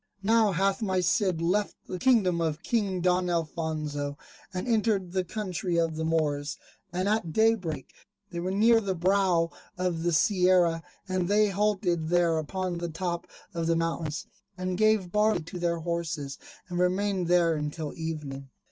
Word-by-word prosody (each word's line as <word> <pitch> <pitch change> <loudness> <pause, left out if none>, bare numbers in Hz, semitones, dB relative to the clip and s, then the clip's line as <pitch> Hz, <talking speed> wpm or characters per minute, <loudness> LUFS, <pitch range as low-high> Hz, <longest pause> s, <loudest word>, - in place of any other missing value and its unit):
Now 220 0 +4
hath 195 +5 +1
my 190 -4 +1
Cid 180 -2 +1
left 200 +4 +1
the 185 - -5
kingdom 195 -9 +3
of 160 +1 -2
King 200 -6 0
Don 180 0 +2
Alfonso, 155 -3 -2 0.3
and 185 +4 -4
entered 215 -5 +1
the 185 0 0
country 180 -3 -3
of 165 -1 +1
the 160 - -3
Moors. 150 -2 0 0.3
And 185 +3 -1
at 210 -6 0
day 225 +4 +5
break 165 - -5 0.4
they 170 - -4
were 180 +2 -2
near 225 +4 +4
the 195 -3 -2
brow 180 -2 +2 0.3
of 180 -2 -1
the 175 +1 +1
Sierra, 180 -1 +3 0.3
and 185 -2 0
they 210 +1 +4
halted 190 -5 0
there 170 -2 +3
upon 180 +2 -3
the 170 0 -3
top 170 +1 -3 0.3
of 165 -1 -2
the 165 - +3
mountains, 165 -2 -2 0.3
and 185 0 -2
gave 215 -3 +2
barley 210 -4 +2
to 170 +3 -7
their 170 -1 0
horses, 165 -4 -3 0.3
and 175 -1 -3
remained 185 0 +1
there 175 -1 +4
until 150 0 -4
evening. 150 -4 -5
175 Hz, 165 wpm, -28 LUFS, 165-195 Hz, 0.4 s, day